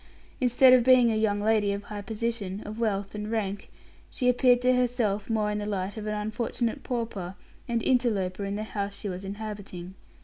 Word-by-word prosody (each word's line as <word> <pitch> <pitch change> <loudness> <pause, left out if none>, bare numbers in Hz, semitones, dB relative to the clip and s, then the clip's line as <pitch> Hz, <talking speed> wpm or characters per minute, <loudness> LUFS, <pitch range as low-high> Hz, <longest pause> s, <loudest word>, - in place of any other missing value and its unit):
Instead 255 +1 +6
of 250 -2 +6
being 250 -2 +6
a - - 0
young 215 -2 +1
lady 210 -1 +2
of 200 0 -4
high 205 0 -6
position, 215 -2 -3
of 215 +2 -7
wealth 200 -3 -1
and 210 0 -5
rank, 205 -3 -2 0.4
she 250 - -2
appeared 250 0 +5
to 250 +1 +3
herself 235 -5 0
more 215 -2 +1
in 210 - -2
the 205 - -3
light 195 0 -2
of 215 -1 -6
an 210 - -1
unfortunate 220 +2 -2
pauper 215 -7 -4 0.3
and 235 -2 -1
interloper 210 -7 +1
in 200 0 -2
the 210 - -3
house 200 -2 -4
she 205 - -5
was 185 +1 -5
inhabiting. 200 -3 -7
215 Hz, 195 wpm, -27 LUFS, 200-235 Hz, 0.4 s, Instead